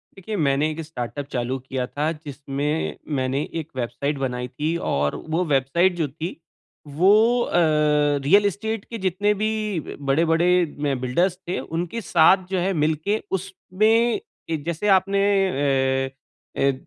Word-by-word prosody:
देखिए 195 +3 -6
मैंने 145 0 +2
एक 160 +1 -5
स्टार्टअप 145 -2 -5
चालू 125 +1 -1
किया 130 0 -3
था 150 +4 -1
जिसमें 145 +2 -3 0.2
मैंने 130 +1 0 0.2
एक 155 - -13
वेबसाइट 130 +4 -2
बनाई 125 -2 -3
थी 150 +6 -2 0.2
और 75 +1 0
वो 165 +3 +1
वेबसाइट 155 +6 +2
जो 160 -3 0
थी 160 +6 -6 0.5
वो 210 +11 +4
अ, - - -2 0.7
रियल 200 +9 +5
एस्टेट 220 +2 -2
के 230 - -6
जितने 200 +3 +2
भी 215 +2 -1 0.6
बड़े-बड़े 165 +4 +3 0.3
म 145 -2 0
बिल्डर्स 175 +9 +1
थे 180 - -1
उनके 175 +7 -4
साथ 180 0 +4
जो 190 - +1
है 190 +2 0
मिलके 160 +6 0 0.2
उसमें 215 +5 +1 0.5
जैसे 170 +5 -2
आपने 195 +1 -1 0.9
अ, - - -8 0.5
ए 140 0 +3
160 Hz, 140 wpm, -23 LUFS, 140-190 Hz, 0.9 s, रियल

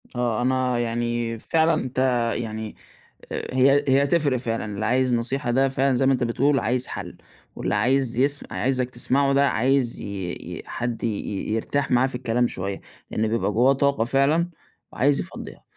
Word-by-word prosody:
آه، 120 -2 0
أنا 130 -1 +1
يعني 120 -1 -2
فعلًا 165 +4 +2
أنت 130 -5 -3 0.4
يعني 110 -2 -5 0.6
هي 135 +2 +2
هي 140 +1 +4
تفرق 145 -5 +2
فعلًا، 115 -2 -3
اللي 105 0 -4
عايز 125 +1 +2
نصيحة 120 +1 -1
ده 135 +2 +3
فعلًا 135 0 +1
زي 135 - +1
ما 135 - +4
أنت 125 -1 0
بتقول 135 +4 +2
عايز 125 +2 0
حل، - - -7 0.4
واللي - - -2
عايز 130 -2 +1
يس 140 +2 +2
عايزك 130 -1 0
تسمعه 135 +3 +1
ده 140 0 +4
عايز 130 0 +1
ي 95 -3 -4
ي - - -8
حد 120 -1 -4
ي 105 -3 -3
يرتاح 140 +5 -1
معاه 125 +1 +4
في 130 - -4
الكلام 120 0 0
شوية، 95 -1 -3 0.3
لأن 110 +1 0
بيبقى 110 -1 0
جواه 125 +5 +4
طاقة 140 -3 +1
فعلًا 140 +7 +2 0.4
وعايز 140 +2 +2
يفضّيها، - - -7
125 Hz, 165 wpm, -24 LUFS, 115-135 Hz, 0.6 s, هي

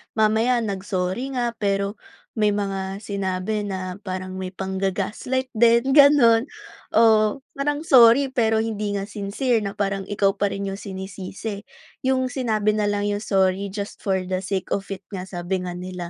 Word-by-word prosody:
Mamaya 225 +3 +2
nag-sorry 195 +5 -3
nga, 240 -1 0
pero 200 0 -1 0.3
may 210 -2 +2
mga 195 -1 -2
sinabi 200 0 -2
na 185 -2 -4
parang 185 -1 -5
may 185 0 -4
pangga-gaslight 195 +7 -2
din, 235 +3 +4
gano'n. 280 -4 +6 0.5
oo. 220 +3 +4
Parang 290 +2 -2
sorry, 260 -2 +6
pero 225 -3 +2
hindi 215 -2 -1
nga 195 - -3
sincere 215 +4 -1
na 200 0 -5
parang 195 -1 -1
ikaw 200 -1 +2
pa 200 0 0
rin 200 0 -3
'yong 195 - -4
sinisisi. 195 +1 -6 0.4
'Yong 260 -1 +2
sinabi 215 -5 +1
na 210 - +1
lang 205 0 -1
'yong 205 0 -2
sorry 195 0 +1
just 205 -1 -5
for 190 -2 +1
the 185 0 -2
sake 195 -2 -2
of 195 - -4
it 190 - -9
nga, 185 -2 -4
sabi 180 0 -3
nga 180 - -4
nila. 180 -1 -6
205 Hz, 160 wpm, -23 LUFS, 190-230 Hz, 0.5 s, gano'n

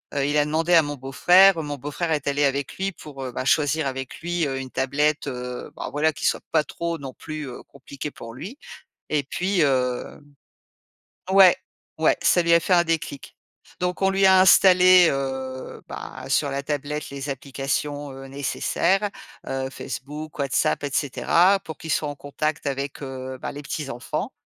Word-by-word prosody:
heu, 140 -1 +1
il 145 +1 +1
a 145 - +3
demandé 160 +3 0
à 165 - +8
mon 145 -1 -4
beau-frère. 175 +7 +5
Mon 145 -1 -5
beau-frère 145 +5 -3
est 150 -2 0
allé 145 +1 +2
avec 140 0 -1
lui 195 +1 -1
pour, 145 -6 -10
heu 130 - -5
bah, 130 - -4
choisir 145 +1 +2
avec 130 -1 -5
lui, 175 -2 -1
heu, 135 -1 -3
une 130 -1 -7
tablette, 150 +3 0
heu 125 -2 -5
bah, - - -5
voilà, 155 +2 +2
qui - - -5
soit - - +1
pas 155 -2 +3
trop 170 +1 -4
non 135 -4 -8
plus, 155 -2 -7
heu, 125 - -8
compliquée 140 +1 -8
pour 115 -3 -10
lui 190 - -8 0.5
et 150 -2 +1
puis, 180 +5 -1
hem 125 -4 0 1.1
ouais, 190 -2 +8 0.4
ouais, 160 - +3
ça 175 - +4
lui 170 0 +3
a 170 - +7
fait 180 - 0
un 175 -1 +5
déclic. 160 -4 -3 0.5
Donc 180 +1 -2
on 190 - +4
lui 195 0 +3
a 190 0 +7
installé, 185 -1 +7
heu, 130 -1 -4
bah, - - -8
sur - - +2
la 140 - -2
tablette 150 +1 -3
les 140 0 -6
applications, 140 +1 -3
heu, 135 0 -9
nécessaires, 170 +8 0 0.4
heu, 135 0 -2
Facebook, 150 +5 -7
WhatsApp 140 +1 +1
et 140 - -4
cetera, 175 +8 +3
pour 160 -4 -9
qu'il 160 - -6
soit 150 - +1
en 145 - -5
contact 150 +2 -3
avec, 140 +1 -3
heu 130 -1 -6
bah, - - -4
les 145 0 -8
petits 145 0 -4
enfants 120 -2 -4
145 Hz, 185 wpm, -24 LUFS, 135-165 Hz, 1.1 s, à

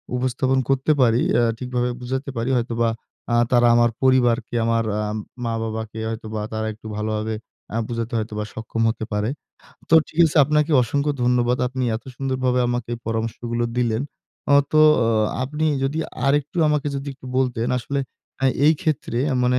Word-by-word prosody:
উপস্থাপন 130 +1 +1
করতে 135 +2 +2
পারি। 120 0 +4
অ্যা 120 - +3
ঠিকভাবে 125 0 -1
বুঝাতে 130 +3 -3
পারি 115 +3 -1
হয়তোবা 115 -1 0 0.4
আ - - +4 0.2
তারা 120 -1 +5
আমার 120 0 +4
পরিবারকে, 125 -3 +3
আমার 115 0 +2 0.2
আ - - 0 0.4
ম-বাবাকে 110 -1 -3
হয়তোবা 110 -1 -5
তারা 110 0 -2
একটু 110 +1 -12
ভালোভাবে 110 +1 -2 0.4
আ - - +1
বুঝাতে 115 0 -3
হয়তোবা 105 -1 -3
সক্ষম 115 0 -4
হতে 110 -1 -3
পারে। 105 +2 0 0.6
তো - - +4
ঠিক 155 - -12
আছে 160 - 0
আপনাকে 150 +2 +1
অসংখ্য 145 +5 0
ধন্যবাদ। 125 0 +2
আপনি 130 +1 -4
এত 110 - -11
সুন্দর 135 -1 -2
ভাবে 125 0 +2
আমাকে 120 -1 -2
পরামর্শগুলো 115 +1 -2
দিলেন। 120 -1 +1 0.5
আ - - +6 0.2
তো 155 - +4 0.3
অ - - +1 0.4
আপনি 150 +4 -3 0.2
যদি 145 +4 -1 0.3
আরেকটু 145 +5 +1
আমাকে 150 -1 0
যদি 140 +1 -5
একটু 130 - -13
বলতেন, 125 -3 0
আসলে 140 +3 -3 0.4
আ - - +3 0.2
এই 155 - +7
ক্ষেত্রে 150 -6 -1
আ - - 0
মানে 125 0 +3
120 Hz, 165 wpm, -22 LUFS, 115-130 Hz, 0.6 s, এই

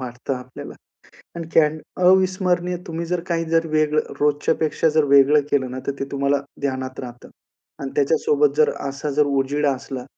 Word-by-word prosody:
वाटतं 125 +1 -5
आपल्याला 125 0 -9 0.6
आणि 165 -1 -6
कॅन्ड 155 0 +3 0.2
अविस्मरणीय 180 -1 +2
तुम्ही 165 0 -4
जर 175 0 -1
काही 165 -1 0
जर 165 0 +2
वेगळं 155 0 0
रोजच्यापेक्षा 150 +2 +1
जर 155 - +5
वेगळं 140 +1 +5
केलं 130 -3 0
ना, 130 - -6
तर 140 - 0
ते 135 - 0
तुम्हाला 140 0 +1 0.2
ध्यानात 130 -2 -3
राहतं 120 -1 -10 0.5
आणि 135 - -4
त्याच्यासोबत 435 - +2
जर 465 0 +4 0.2
असा 140 +2 -4
जर 150 +1 +2
उजेड 140 +1 0
असला, 130 -2 -3
150 Hz, 160 wpm, -21 LUFS, 135-165 Hz, 0.6 s, जर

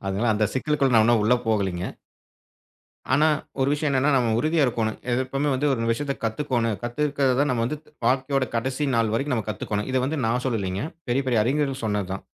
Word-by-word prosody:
அதனால 105 +5 0
அந்தச் 105 0 0
சிக்கலுக்குள்ள 135 -1 +1
நான் 110 -1 +6
இன்னும் 115 -2 +3
உள்ள 110 +4 +4
போகலிங்க. 95 -5 0 1.3
ஆனா, 150 +4 +4 0.3
ஒரு 135 - +2
விஷயம் 150 0 0
என்னன்னா, 140 +2 +2
நம்ம 120 -3 +2
உறுதியா 155 -1 +2
இருக்கோனும். 110 -3 -1 0.3
எப்பவுமே 135 +3 -1
வந்து 145 +3 0
ஒரு 115 -3 -1
விஷயத்தைக் 140 +3 -4
கத்துக்கோணும். 115 -2 -1
கத்துக்கிறது 135 +1 0
தான் 145 - +2
நம்ம 115 -2 0
வந்து 150 +4 -3 0.3
வாழ்க்கையோட 130 0 +1
கடைசி 130 +5 -1
நாள் 110 -2 +1
வரைக்கும் 135 +2 0
நாம 110 - -3
கத்துக்கோணும். 105 +2 -3
இத - - +1
வந்து 150 +3 -2
நான் 125 +2 0
சொல்லலைங்க. 100 -2 -2 0.3
பெரிய, 135 +3 +1
பெரிய 115 -4 +3
அறிஞர்கள் 135 0 0
சொன்னதுதான். 100 -3 -2
125 Hz, 180 wpm, -24 LUFS, 110-140 Hz, 1.3 s, நான்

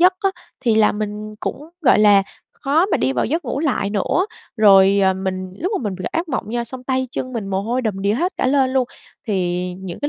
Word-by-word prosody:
giấc 365 +1 +6
á, 390 -2 +2 0.3
thì 230 -3 +2
là 215 -1 +4
mình 210 0 -5
cũng, 300 +3 -5
gọi 275 - +5
là, 205 -2 +6 0.4
khó 310 +7 +2
mà - - +1
đi 130 +1 0
vào 125 - 0
giấc 325 +6 -1
ngủ 260 +3 -2
lại 255 -10 0
nữa. 215 - 0 0.3
Rồi, 195 -2 +6
ờ, 190 0 +3
mình 185 -1 -4
lúc 370 +6 -1
mà - - -7
mình 205 -4 -2
gặp 185 - -3
ác 330 0 -2
mộng 260 - -2
nha, 240 0 -1
xong 255 +2 -7
tay 260 0 -1
chân 255 - -4
mình 225 -5 -4
mồ 195 0 -1
hôi 245 +4 -1
đầm 200 -4 -2
đìa 200 +1 +2
hết 350 +10 0
cả - - 0
lên 265 -1 +3
luôn, 260 -1 +2 0.4
thì 180 -3 -1
những 185 -3 -7
cái 290 - -1
220 Hz, 245 wpm, -20 LUFS, 195-270 Hz, 0.4 s, giấc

